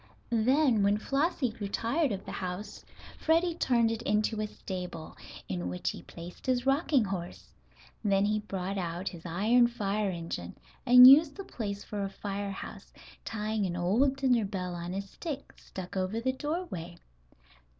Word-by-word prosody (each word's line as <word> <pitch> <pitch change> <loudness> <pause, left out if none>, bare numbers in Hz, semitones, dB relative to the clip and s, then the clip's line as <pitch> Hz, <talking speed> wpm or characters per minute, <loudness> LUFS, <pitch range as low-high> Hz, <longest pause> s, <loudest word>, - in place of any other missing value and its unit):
Then, 245 +1 +3
when 200 +1 +3
Flossie 275 +2 0
grew 215 -2 -5
tired 240 +8 0
of 195 -1 -4
the - - -6
house, 185 +2 -5 0.4
Freddie 330 +2 +2
turned 235 -8 +2
it 225 0 -3
into 215 -1 0
a 215 - -1
stable, 180 -5 -7 0.3
in 90 -1 -3
which 90 0 -2
he - - -9
placed 175 +8 -11
his 250 -1 +1
rocking 275 -1 +3
horse. 180 -3 -6 0.5
Then 200 -1 +3
he 215 +1 +1
brought 195 -2 -4
out 175 +1 -3
his 170 0 -9
iron 220 +8 +4
fire 210 -3 -1
engine, 165 - -5 0.3
and 250 0 +10
used 285 +3 +8
the 395 - -6
place 205 - -5
for 205 -1 -5
a 195 - -2
fire 200 0 -4
house, 195 - -8 0.3
tying 215 -2 -2
an 175 - -3
old 220 +11 +2
dinner 255 -4 +2
bell 185 -3 -3
on 175 +1 -5
a 200 - -2
stick, 280 - -7
stuck 185 0 -9
over 190 +4 -1
the 260 +3 0
doorway. 265 - -4
210 Hz, 165 wpm, -30 LUFS, 185-250 Hz, 0.5 s, and